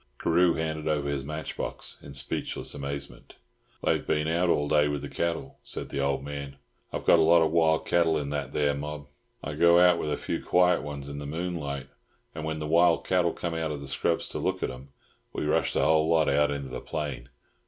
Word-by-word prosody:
Carew 85 Hz, +1 st, +3 dB
handed 80 Hz, -1 st, -3 dB
over 75 Hz, -2 st, 0 dB
his 70 Hz, -1 st, -2 dB
match 75 Hz, +2 st, -5 dB
box -, -, -5 dB
in 70 Hz, -1 st, -11 dB
speechless 65 Hz, -, -4 dB
amazement. 70 Hz, 0 st, -7 dB, 0.5 s
"They've -, -, +1 dB
been 75 Hz, 0 st, +1 dB
out 85 Hz, +2 st, +1 dB
all 75 Hz, -3 st, +2 dB
day 75 Hz, 0 st, +4 dB
with 75 Hz, -1 st, -3 dB
the -, -, -4 dB
cattle," 85 Hz, -5 st, -3 dB
said -, -, -6 dB
the 70 Hz, -, -3 dB
old 70 Hz, -1 st, 0 dB
man. 70 Hz, -1 st, -6 dB, 0.4 s
"I've -, -, -4 dB
got 85 Hz, -, +6 dB
a -, -, +5 dB
lot 85 Hz, +1 st, +6 dB
of 80 Hz, -, +1 dB
wild 80 Hz, -1 st, +3 dB
cattle 85 Hz, -2 st, +3 dB
in 70 Hz, -1 st, -3 dB
that 75 Hz, -2 st, -3 dB
there 75 Hz, -1 st, +1 dB
mob. 75 Hz, +1 st, -5 dB, 0.4 s
I 75 Hz, -, -4 dB
go 85 Hz, +3 st, +5 dB
out 90 Hz, -1 st, +5 dB
with 75 Hz, -, -2 dB
a 75 Hz, -, 0 dB
few -, -, -3 dB
quiet 90 Hz, 0 st, +3 dB
ones 70 Hz, -1 st, -6 dB
in 70 Hz, 0 st, -6 dB
the 70 Hz, -, -6 dB
moonlight, 75 Hz, -4 st, -4 dB, 0.4 s
and 80 Hz, -, -6 dB
when 80 Hz, 0 st, -2 dB
the 75 Hz, -, -4 dB
wild 85 Hz, +2 st, +4 dB
cattle 90 Hz, -2 st, +2 dB
come 85 Hz, 0 st, -4 dB
out 80 Hz, -1 st, -2 dB
of 75 Hz, -2 st, -4 dB
the 70 Hz, -, -8 dB
scrubs 70 Hz, -, 0 dB
to -, -, -4 dB
look -, -, -1 dB
at -, -, -1 dB
'em 65 Hz, +2 st, -11 dB, 0.4 s
we -, -, -2 dB
rush -, -, +1 dB
the -, -, +1 dB
whole 80 Hz, 0 st, +3 dB
lot 80 Hz, -2 st, +3 dB
out 75 Hz, +1 st, +3 dB
into 70 Hz, -2 st, -4 dB
the 65 Hz, -, -6 dB
plain. 75 Hz, -3 st, -5 dB
75 Hz, 225 wpm, -27 LUFS, 70-80 Hz, 0.5 s, got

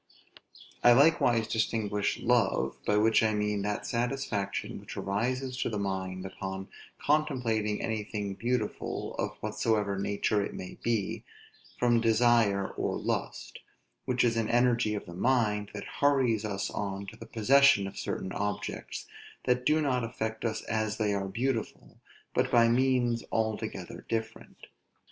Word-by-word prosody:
I 120 Hz, -, +8 dB
likewise 120 Hz, -5 st, +4 dB
distinguish 105 Hz, -2 st, 0 dB
love, 120 Hz, -5 st, +2 dB
(by 105 Hz, -, +3 dB
which 110 Hz, +1 st, +4 dB
I 110 Hz, -1 st, +2 dB
mean 105 Hz, -1 st, 0 dB
that 105 Hz, +1 st, -2 dB
satisfaction 120 Hz, -4 st, -2 dB
which -, -, -10 dB
arises 125 Hz, +6 st, -1 dB
to -, -, -1 dB
the 105 Hz, -, -3 dB
mind 95 Hz, -2 st, -3 dB
upon 95 Hz, 0 st, -6 dB, 0.3 s
contemplating 125 Hz, -9 st, +1 dB
anything 105 Hz, -2 st, -3 dB
beautiful, 120 Hz, +5 st, -2 dB
of -, -, -2 dB
whatsoever 105 Hz, -3 st, 0 dB
nature 100 Hz, +1 st, 0 dB
it -, -, -5 dB
may 90 Hz, -, -8 dB
be,) 115 Hz, -5 st, -1 dB, 0.5 s
from 120 Hz, -1 st, +3 dB
desire 115 Hz, -3 st, +3 dB
or -, -, -2 dB
lust; -, -, -3 dB, 0.5 s
which 125 Hz, -2 st, +1 dB
is 115 Hz, -2 st, +2 dB
an 115 Hz, -1 st, 0 dB
energy 120 Hz, -2 st, +3 dB
of 105 Hz, -, -5 dB
the 85 Hz, -, -9 dB
mind, 105 Hz, -1 st, +1 dB
that 100 Hz, -, -5 dB, 0.2 s
hurries 130 Hz, -7 st, +3 dB
us 100 Hz, -1 st, -2 dB
on 100 Hz, -1 st, -3 dB
to 100 Hz, +3 st, -9 dB
the -, -, -11 dB
possession 125 Hz, -2 st, +5 dB
of 95 Hz, -, -7 dB
certain 95 Hz, -, -4 dB
objects, 105 Hz, +1 st, -4 dB, 0.4 s
that 125 Hz, 0 st, +1 dB
do 155 Hz, +1 st, +4 dB
not 125 Hz, -4 st, +1 dB
affect 110 Hz, -1 st, -4 dB
us 110 Hz, -2 st, -2 dB
as 110 Hz, -1 st, -1 dB
they 105 Hz, -2 st, +1 dB
are 100 Hz, -1 st, -1 dB
beautiful, 115 Hz, +3 st, -3 dB, 0.3 s
but -, -, +1 dB
by 115 Hz, -1 st, +5 dB
means 120 Hz, -1 st, +2 dB
altogether 110 Hz, -1 st, -3 dB
different. 110 Hz, 0 st, -4 dB
110 Hz, 145 wpm, -29 LUFS, 105-120 Hz, 0.5 s, I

